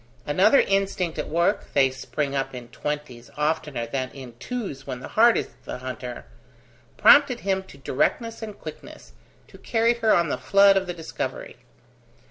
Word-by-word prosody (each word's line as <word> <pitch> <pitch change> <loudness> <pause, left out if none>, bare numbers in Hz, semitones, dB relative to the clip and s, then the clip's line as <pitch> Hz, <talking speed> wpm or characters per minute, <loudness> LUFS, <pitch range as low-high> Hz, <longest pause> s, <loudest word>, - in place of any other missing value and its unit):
Another 185 - +4
instinct 195 -4 -1
at - - -3
work 170 +2 0
(they 135 -2 +4
spring 140 +2 -3
up 135 -1 -2
in 120 -1 -9
twenties 140 -2 -5
oftener 150 -5 -1
than 130 +2 -3
in 130 -3 -10
twos 145 - -5
when 130 -2 -5
the - - -9
heart 230 +1 +5
is - - -2 0.2
the - - -5
hunter) 125 -1 -7 0.7
prompted 250 +2 +6
him 190 -1 0
to 140 - -15
directness 225 - -1
and 215 -2 -7
quickness, - - -11 0.3
to - - -16
carry 230 0 +2
her 230 -2 +1
on 170 -2 +3
the - - -2
flood 200 0 +5
of 190 -1 0
the 175 - -3
discovery. 160 -2 -6
155 Hz, 165 wpm, -24 LUFS, 130-200 Hz, 0.7 s, prompted